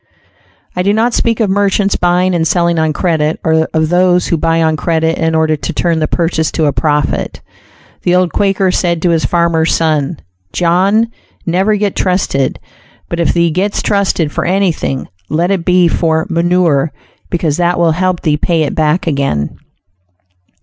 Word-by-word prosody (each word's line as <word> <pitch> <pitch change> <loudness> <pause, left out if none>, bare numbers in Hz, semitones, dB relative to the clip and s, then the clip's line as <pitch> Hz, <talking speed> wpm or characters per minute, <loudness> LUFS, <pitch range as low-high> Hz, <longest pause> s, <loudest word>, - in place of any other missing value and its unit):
I 180 - 0
do 200 +3 +1
not 230 +3 +1
speak 230 -1 0
of 220 - +2
merchants 200 0 +1
buying 180 +1 +1
and 165 -2 +1
selling 170 0 +1
on 160 -1 +1
credit, 160 -2 -1
or 160 0 +1
of 160 -1 0
those 180 0 +2
who - - 0
buy 165 +1 +1
on 160 -1 +1
credit 160 0 -1
in 160 -1 0
order 160 -1 +2
to 160 +3 -5
turn 165 +1 0
the 155 - 0
purchase 165 -2 -1
to 160 - 0
a 145 - +1
profit. 150 -2 -1 0.6
The 180 - +1
old 180 -2 +1
Quaker 195 -2 +1
said 170 -3 -1
to 175 - +3
his 165 -1 +1
farmer 170 -2 +1
son, 155 -1 0 0.4
"John, 190 +6 +2 0.4
never 190 +5 +1
get 205 -1 -1
trusted; 180 -8 0 0.5
but 170 - -3
if 170 - +2
thee 170 -1 +1
gets 195 +5 -1
trusted 190 -6 0
for - - -2
anything, 180 -8 -1 0.2
let 170 +4 0
it 185 -4 -1
be 180 -1 +4
for 160 -1 0
'manure,' 170 -4 +1 0.4
because 165 -4 -1
that 175 0 +1
will 170 -1 +3
help 180 +1 -1
thee 150 -2 +1
pay 165 +1 0
it 145 - -2
back 155 +2 0
again." 135 - -1
170 Hz, 175 wpm, -13 LUFS, 160-185 Hz, 0.6 s, be